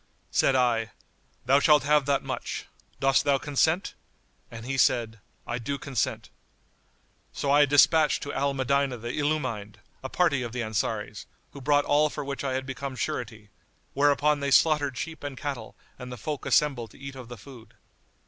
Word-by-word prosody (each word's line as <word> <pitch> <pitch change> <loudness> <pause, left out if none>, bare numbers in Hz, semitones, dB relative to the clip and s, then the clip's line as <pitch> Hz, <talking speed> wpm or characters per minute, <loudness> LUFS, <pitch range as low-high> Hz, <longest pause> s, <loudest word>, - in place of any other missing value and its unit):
Said 135 - +3
I, 115 -4 +1 0.5
"Thou 135 +3 +5
shalt 150 -2 +5
have 145 -1 +3
that 140 -1 +1
much; - - -5 0.3
dost 135 -1 +3
thou 140 -1 +3
consent?"; 160 +6 0 0.6
and 115 0 -9
he 135 +2 -2
said, 115 -3 +1 0.3
"I 120 +1 -3
do 140 +4 -3
consent." 135 -4 -3 1.0
So 140 - -1
I 145 0 +5
despatched 150 +2 +4
to 145 - -5
Al 140 0 0
Medinah 135 0 0
the 120 +1 -6
Illumined[FN#92] 130 -9 -2 0.3
a 130 - -6
party 160 -6 +2
of 120 -2 -5
the 125 -1 -2
Ansaris, 105 -1 -3 0.2
who 140 - -11
brought 145 +2 +2
all 150 +1 +3
for 145 - -6
which 140 0 -4
I 135 -2 -1
had 130 0 -2
become 135 0 -5
surety; 115 -3 -4 0.4
whereupon 145 +1 +3
they 140 0 -1
slaughtered 145 -2 +3
sheep 160 +4 -6
and 140 -2 -6
cattle 135 -7 -5 0.2
and 125 -1 -8
the 125 - -7
folk 145 +5 -5
assembled 135 -6 +2
to - - -18
eat 135 0 -8
of 130 -3 -9
the 120 0 -9
food. 115 -1 -14
135 Hz, 175 wpm, -27 LUFS, 120-145 Hz, 1.0 s, Thou